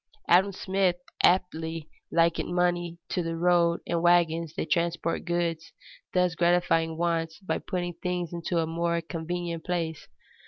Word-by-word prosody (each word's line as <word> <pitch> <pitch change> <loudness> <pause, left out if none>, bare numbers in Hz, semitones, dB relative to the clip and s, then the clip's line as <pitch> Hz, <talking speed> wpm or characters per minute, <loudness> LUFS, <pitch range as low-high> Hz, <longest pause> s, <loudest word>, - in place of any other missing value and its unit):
Adam 190 +3 +5
Smith 190 -1 +1 0.3
aptly 165 -3 +1 0.2
likened 170 +1 +2
money 175 -1 +1
to 180 - -1
the 165 -1 -3
road 170 0 +3
and 170 -1 -1
wagons 170 -2 +3
that 155 - -4
transport 170 -1 0
goods, 170 -2 -2 0.4
thus 180 -1 +2
gratifying 165 -1 +2
wants 165 -1 -1
by 190 - -2
putting 175 -1 -3
things 180 -1 -3
into 170 +1 -2
a 165 - +2
more 170 +1 0
convenient 170 0 -4
place. 165 -3 -3
170 Hz, 140 wpm, -27 LUFS, 165-175 Hz, 0.4 s, Adam